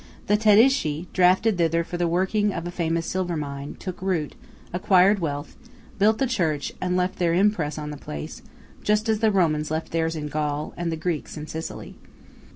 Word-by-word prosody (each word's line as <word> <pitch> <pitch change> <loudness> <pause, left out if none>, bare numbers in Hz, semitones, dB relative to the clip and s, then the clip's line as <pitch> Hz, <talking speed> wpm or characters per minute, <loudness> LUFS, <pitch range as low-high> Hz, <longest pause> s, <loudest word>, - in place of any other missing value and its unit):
The 205 - +3
Tedeschi, 210 - +4
drafted 185 +2 +3
thither 165 0 +2
for 175 - -7
the 175 0 +1
working 190 +5 +1
of 165 - -4
a 175 - -4
famous 165 -1 -1
silver 180 -2 -2
mine, 140 -1 -5
took 185 -2 -7
root, 180 -6 -1 0.4
acquired 190 +2 +4
wealth, 145 -4 -4 0.4
built 215 +2 +4
the 270 - +1
church, 165 - -1
and 180 0 0
left 180 0 -1
their 170 -2 +2
impress 180 -6 +1
on 150 -1 -5
the 150 - -7
place, 75 - -7 0.4
just 210 +1 +1
as 220 -1 +2
the 220 -1 +3
Romans 155 -6 +1
left 160 +1 -3
theirs 165 0 0
in 150 -1 -4
Gaul, 150 0 -2
and 170 -1 -2
the - - -1
Greeks 165 -1 -3
in 150 - -6
Sicily. 160 +1 -7
175 Hz, 185 wpm, -24 LUFS, 155-195 Hz, 0.4 s, Tedeschi